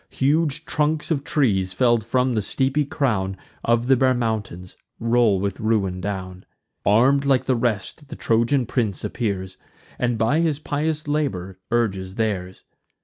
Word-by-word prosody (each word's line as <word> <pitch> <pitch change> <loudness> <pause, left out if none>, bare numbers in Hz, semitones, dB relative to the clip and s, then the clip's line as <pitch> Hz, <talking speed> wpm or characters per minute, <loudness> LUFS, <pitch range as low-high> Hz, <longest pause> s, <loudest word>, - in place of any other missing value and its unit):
Huge 145 +1 +1
trunks 155 +1 0
of 140 -3 0
trees, 95 -12 +1
fell'd 120 +2 +2
from 125 +3 +1
the 110 - +1
steepy 135 +7 +1
crown 100 -10 -1 0.3
Of 115 0 +2
the 135 +1 +5
bare 130 0 +3
mountains, 105 -6 -3 0.2
roll 115 -4 +3
with 100 0 -3
ruin 100 -5 0
down. 95 -1 -5 0.4
Arm'd 130 +7 +4
like 135 -2 +2
the 130 - +2
rest 120 +5 -2
the 150 - -8
Trojan 120 +3 +1
prince 110 -5 -1
appears, 95 -5 -3 0.4
And 120 -2 0
by 115 +8 +2
his 160 -4 +1
pious 150 +1 -2
labour 95 -12 -2
urges 95 -5 -1
theirs. 95 -5 -2
115 Hz, 145 wpm, -23 LUFS, 100-135 Hz, 0.4 s, the